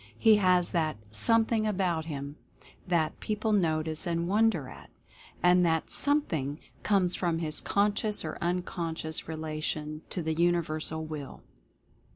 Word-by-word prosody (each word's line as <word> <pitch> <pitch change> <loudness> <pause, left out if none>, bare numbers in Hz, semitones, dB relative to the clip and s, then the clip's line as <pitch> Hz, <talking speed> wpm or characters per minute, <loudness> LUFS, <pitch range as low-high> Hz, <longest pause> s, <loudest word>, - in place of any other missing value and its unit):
He 220 -2 +6
has 180 -3 +3
that 160 -5 0
'something 220 - +2
about 180 -6 0
him' 140 -2 -6 0.5
that 165 -3 0
people 215 +1 -2
notice 160 -4 +1
and 170 0 -1
wonder 205 -7 +2
at. - - -12 0.5
And 180 0 +5
that 160 -2 0
'something' 165 - 0 0.2
comes 190 -4 +2
from 170 -3 0
his 155 -2 0
conscious 205 +1 0
or - - -5
unconscious 170 -2 -2
relation 155 -1 -4
to 175 - -3
the 160 0 -1
Universal 160 -1 0
Will." 150 -3 -7
170 Hz, 130 wpm, -29 LUFS, 155-195 Hz, 0.5 s, He